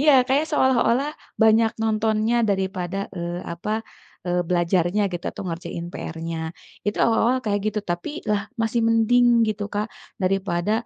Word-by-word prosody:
iya 300 +1 +6 0.2
kayak 290 +4 +2
seolah-olah 265 0 +2 0.2
banyak 220 0 +4
nontonnya 220 +1 +1
daripada, 190 -3 -1 0.2
eee, 175 +1 -4
apa, 215 +6 -3 0.4
eee, 180 0 +1
belajarnya 175 +2 +2
gitu 175 - -5
atau - - -8
ngerjain 170 0 -5
PR-nya, 165 0 -5 0.5
itu 205 - -2
awal-awal 230 +2 +3
kayak 205 -2 0
gitu 215 - -2
tapi 175 - -2 0.2
lah 205 -1 +2 0.2
masih 225 +1 +1
mending 230 +2 +4 0.2
gitu 210 -1 -2
Kak, 210 +1 0 0.4
daripada 190 0 0
210 Hz, 140 wpm, -23 LUFS, 175-225 Hz, 0.5 s, iya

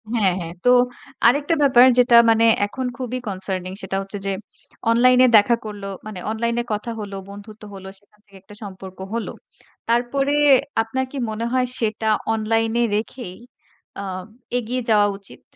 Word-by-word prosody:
হ্যাঁ, 195 -5 +2
হ্যাঁ। 170 0 -6
তো - - +5 0.6
আরেকটা 285 +6 +2
ব্যাপার 255 -3 +6
যেটা 245 -1 +5
মানে 225 0 +4 0.2
এখন 260 +4 -5
খুবই 255 -1 -4
কনসার্নিং। 185 -2 -4
সেটা 190 0 -4
হচ্ছে 195 +1 -7
যে 195 - 0 0.6
অনলাইন 250 +2 +4
এ - - +5
দেখা 220 +3 +4
করলো, 205 -2 -7 0.2
মানে 215 -4 -7
অনলাইন 235 +1 -1
এ - - -5
কথা 210 +3 -4
হল, 205 -2 -6 0.2
বন্ধুত্ব 210 +2 -12
হল 190 -1 -10
সেখান 210 +1 -32
থেকে 200 -1 -17
একটা 205 +2 -15
সম্পর্ক 190 -1 -10 0.2
হলো। 230 -1 -3 0.6
তারপরে 250 +4 +1 0.5
আপনার 260 +4 -2
কি 285 - -7
মনে 220 +2 -3
হয় 255 -1 +2
সেটা 220 -1 -1 0.2
অনলাইন 225 +1 0
এ - - +3
রেখেই 215 -3 -5 0.7
আম 185 -2 -6 0.3
এগিয়ে 245 +2 -3
যাওয়া 210 -2 +4
উচিত? 200 - -13
220 Hz, 160 wpm, -21 LUFS, 200-240 Hz, 0.7 s, ব্যাপার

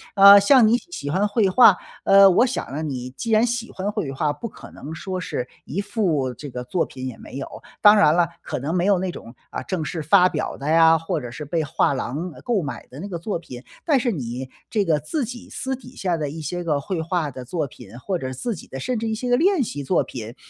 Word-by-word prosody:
呃， 200 0 +10
像 230 +3 +6
你 230 +2 +4
喜 250 - -7
欢 190 +7 +1
绘 205 -1 +2
画， 205 -1 +7 0.3
呃， 195 0 +7
我 190 +7 +4
想 255 - -4
呢， 150 +3 -4
你 130 -4 -4
既 135 - -5
然 220 +1 +5
喜 235 -1 -2
欢 195 +2 -3
绘 140 -9 -3
画， 150 +2 0
不 230 - -6
可 - - -13
能 150 +3 -9
说 185 +3 -4
是 125 -8 -4 0.2
一 195 - -3
幅 170 - 0
这 145 -2 -9
个 125 0 -5
作 165 +8 -1
品 130 0 -7
也 125 - -7
没 135 - -10
有， 135 - -5 0.3
当 210 -1 +8
然 155 -7 +5
了， - - +2 0.2
可 - - -4
能 150 +7 -3
没 180 0 +1
有 200 -3 +3
那 185 - -2
种， 115 -6 -11 0.2
啊， - - -5
正 185 -4 -3
式 165 - -4
发 180 +4 +5
表 - - -3
的 140 - -6
呀， 165 0 +6
或 165 0 -3
者 120 -2 -7
是 150 +5 -7
被 160 +2 -1
画 145 - +1
廊， 145 +7 -4
呃， - - -13
购 230 -6 0
买 145 - -6
的 135 - -11
那 195 - -5
个 180 -4 -4
作 170 +2 -3
品， 125 -6 -10 0.2
但 295 -5 +4
是 240 -1 0
你 130 - -5 0.2
这 215 -3 +1
个 155 -3 +2
自 275 - -3
己 245 +3 -9
私 265 0 -4
底 260 0 -14
下 180 -3 -1
的 150 -2 -3
一 160 +3 -7
些 175 +4 -4
个 155 -4 0
绘 170 +3 -3
画 165 -2 -1
的 130 -1 -9
作 160 +4 -2
品， 120 -3 -13
或 185 +7 -2
者 130 -2 -4
自 225 - -3
己 - - -12
的 135 - -8
甚 240 - -2
至 225 - -3
一 220 - -1
些 245 +3 -4
个 245 - +4
练 365 -3 +3
习 145 - -5
作 - - +2
品， 115 0 -8
170 Hz, 280 characters per minute, -22 LUFS, 140-210 Hz, 0.3 s, 呃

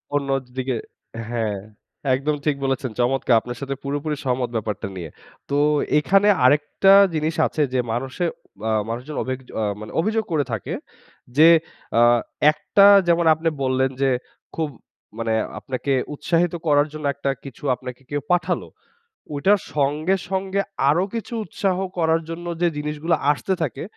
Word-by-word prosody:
অন্য 140 -1 -1 0.2
দি 125 - -26
দিকে 130 -1 -1 0.5
হ্যাঁ 110 -4 -1 0.6
একদম 150 +3 -1
ঠিক 150 -2 +2
বলেছেন। 135 -1 -1
চমৎকার 125 0 +2
আপনার 120 0 -7
সাথে 140 0 -3
পুরোপুরি 145 +2 -2
সহমত 125 -2 0
ব্যাপারটা 105 -2 -3
নিয়ে। 85 -4 -6 0.4
তো 140 - +1 0.4
এইখানে 195 +7 +3 0.2
আরেকটা 150 +8 +4 0.2
জিনিস 155 +1 -1
আছে 155 - -3
যে 130 -1 -2
মানুষে 130 +8 -3 0.5
আ - - +1 0.2
মানুষজন 125 +6 -5
অভিগয 130 0 -5 0.2
আ - - +1 0.2
মানে 110 - -8
অভিযোগ 220 +4 0
করে 150 -3 +2
থাকে। 110 -5 -3 0.6
যে 160 +2 +8 0.5
আ - - +6 0.5
একটা 200 +6 +3 0.2
যেমন 170 0 +3
আপনি 160 +1 0
বললেন 130 0 +2
যে 135 - +3 0.5
খুব 160 -2 -1 0.5
মানে 115 -1 -1 0.3
আপনাকে 135 +1 -2 0.2
উৎসাহিত 170 +3 +1
করার 145 0 +4
জন্য 155 -1 -6
একটা 140 -1 -3 0.2
কিছু 135 -1 -11
আপনাকে 125 0 -9
কেউ 145 0 -2
পাঠালো। 180 0 +1 0.7
ঐটার 195 +8 +3 0.2
সঙ্গে, 150 +6 +1
সঙ্গে 195 +1 0 0.3
আরো 170 +6 +3
কিছু 230 +1 -5
উৎসাহ 190 -3 -1 0.2
করার 165 0 +2
জন্য 170 +1 -6 0.2
যে 175 - +4
জিনিসগুলো 150 +3 -1 0.2
আসতে 190 +6 -1
থাকে, 140 -3 -2
145 Hz, 150 wpm, -22 LUFS, 130-165 Hz, 0.7 s, যে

